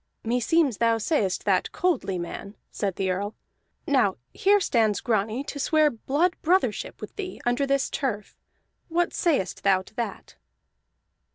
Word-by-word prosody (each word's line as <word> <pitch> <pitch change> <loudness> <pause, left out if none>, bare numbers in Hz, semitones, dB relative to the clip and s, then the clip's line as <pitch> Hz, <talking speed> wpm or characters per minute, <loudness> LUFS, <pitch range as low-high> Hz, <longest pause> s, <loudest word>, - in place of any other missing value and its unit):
"Meseems 250 +3 +2
thou 230 -1 +3
sayest 215 - 0
that 190 -3 +2
coldly, 335 - 0
man," 195 +4 -6 0.2
said 195 -3 -2
the 190 -1 0
Earl. 200 +3 -3 0.5
"Now 255 -9 +2 0.2
here 410 +1 +4
stands 225 - +2
Grani 220 +2 0
to 285 - -6
swear 305 +1 +3
blood 290 +10 0
brothership 375 +8 +1
with - - -9
thee, 375 -2 -5
under 245 +3 +1
this 275 -1 +2
turf. 210 -7 -3 0.5
What 345 +1 +1
sayest 280 - 0
thou 190 -1 +3
to 190 - -18
that?" 235 - -5
240 Hz, 145 wpm, -26 LUFS, 205-310 Hz, 0.5 s, here